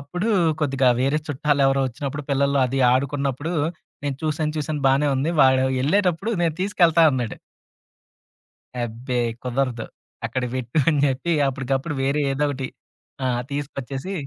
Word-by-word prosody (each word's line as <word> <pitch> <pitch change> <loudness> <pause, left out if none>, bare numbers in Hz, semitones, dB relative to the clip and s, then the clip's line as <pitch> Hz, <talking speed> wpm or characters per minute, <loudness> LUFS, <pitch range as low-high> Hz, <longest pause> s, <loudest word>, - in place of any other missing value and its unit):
అప్పుడు 180 +10 -3 0.3
కొద్దిగా 135 -3 +2
వేరే 140 +4 +2
చుట్టాలెవరో 135 -1 +2
ఒచ్చినప్పుడు, 140 +4 -5
పిల్లలు 140 0 +2
అది 135 +2 -1
ఆడుకున్నప్పుడు 140 +4 -1 0.5
నేను 140 -2 -2
చూసాను 155 0 -1
చూసాను 150 0 -2
బానే 140 +2 +3
ఉంది. 145 +5 0
వాడు 130 0 +5 0.2
ఎళ్ళేటప్పుడు 185 +5 +1
"నేను 165 -2 +1
తీసుకెళ్తా" 175 -4 +3
అన్నాడు. 125 -4 -2 1.5
అబ్బే 120 +2 -3 0.2
కుదరదు. 125 -2 -2 0.4
"అక్కడ 130 - -3
పెట్టు" 130 +4 -2
అని 150 -3 +1
చెప్పి 135 +6 -1 0.2
అప్పటికప్పుడు 135 +3 -2
వేరే 140 +2 +1
ఏదో 145 +2 0
ఒకటి 130 -1 -4 0.6
ఆ! - - +1 0.2
తీసుకొచ్చేసి 140 +3 -5
140 Hz, 125 wpm, -23 LUFS, 130-150 Hz, 1.5 s, వాడు